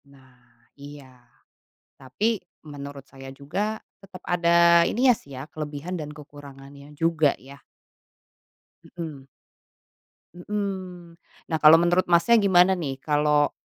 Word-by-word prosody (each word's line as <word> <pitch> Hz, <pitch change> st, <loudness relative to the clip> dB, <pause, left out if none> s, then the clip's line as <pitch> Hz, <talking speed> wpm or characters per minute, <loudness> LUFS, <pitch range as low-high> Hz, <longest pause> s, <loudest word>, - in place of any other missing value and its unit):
Nah, 130 Hz, -2 st, -21 dB, 0.5 s
iya, 140 Hz, -3 st, -13 dB, 0.7 s
tapi 200 Hz, -, -3 dB, 0.2 s
menurut 140 Hz, -2 st, -9 dB
saya 135 Hz, -1 st, -12 dB
juga 185 Hz, +11 st, -4 dB, 0.2 s
tetap 190 Hz, -2 st, -13 dB
ada 170 Hz, -1 st, +4 dB
ininya 250 Hz, +1 st, +3 dB
sih 140 Hz, -, -17 dB
ya, 135 Hz, -, -8 dB
kelebihan 155 Hz, +3 st, -7 dB
dan 155 Hz, -4 st, -6 dB
kekurangannya 140 Hz, -1 st, -13 dB
juga, 160 Hz, -3 st, +1 dB
ya. 140 Hz, +1 st, -15 dB, 1.4 s
Mhm. 150 Hz, -5 st, -8 dB, 1.1 s
Mhm. 180 Hz, -3 st, -6 dB, 0.3 s
Nah 160 Hz, -, +1 dB
kalau 155 Hz, +1 st, +8 dB
menurut 175 Hz, +2 st, +2 dB
Masnya 175 Hz, +7 st, +4 dB
gimana 190 Hz, -2 st, +4 dB
nih 140 Hz, -5 st, -4 dB
kalau 150 Hz, -1 st, +1 dB
155 Hz, 110 wpm, -24 LUFS, 140-180 Hz, 1.4 s, kalau